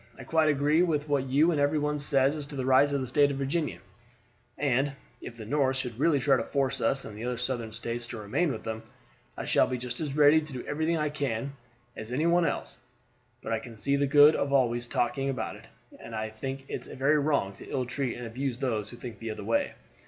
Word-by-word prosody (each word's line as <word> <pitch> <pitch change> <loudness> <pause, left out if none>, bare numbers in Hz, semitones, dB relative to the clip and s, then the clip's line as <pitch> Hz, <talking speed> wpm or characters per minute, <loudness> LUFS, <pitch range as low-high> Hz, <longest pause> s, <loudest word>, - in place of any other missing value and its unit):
I 135 - -9
quite 155 +4 +2
agree 150 +3 +3
with 155 -4 +1
what 140 -2 0
you 150 +6 +4
and 150 -3 +1
every 145 +2 +2
one 150 0 0
say 140 -2 +3
as 145 +1 0
to 145 - -9
the 130 -2 -2
rights 135 +2 +5
of 140 -1 0
the - - -2
State 145 +3 +4
of 140 - -3
Virginia, 140 - -1 0.8
and 140 0 +1 0.3
if 115 - -9
the 110 - -8
North 135 +2 +1
should 125 -3 -4
really 150 -1 +3
try 135 0 +3
to 115 - -1
force 135 -1 -1
us 135 +4 +1
and 105 - -8
the 110 - -7
other 125 0 -2
Southern 120 -2 -2
States 120 +2 -3
to 120 - -6
remain 110 +11 0
with - - -6
them, 110 0 -4 0.6
I - - -4
shall - - +3
be 130 - -2
just 125 0 -5
as 150 -2 -3
ready 150 +1 +6
to 155 -2 -8
do 125 - -6
everything 160 +3 0
I 150 -1 0
can 140 -3 -3 0.4
as 110 +2 -8
any 145 +6 0
one 170 0 +4
else; - - -4 0.6
but - - -2
I 110 - 0
can't 115 -1 -11
see 140 +7 +1
the 140 0 +1
good 145 +2 +7
of 140 - -1
always 120 -3 +2
talking 135 +3 0
about 135 - -3
it, - - -14 0.3
and 115 - -8
I 110 0 -3
think 135 +5 -6
it's - - -5
very 140 +3 +2
wrong 140 -9 +1
to - - -11
ill 130 -2 -1
treat 125 +1 -3
and 120 - -6
abuse 125 +2 -3
those 110 -5 -2
who 120 - -9
think 120 -1 -8
the 115 - -5
other 110 - -5
way. 285 0 0
135 Hz, 240 wpm, -28 LUFS, 120-145 Hz, 0.8 s, good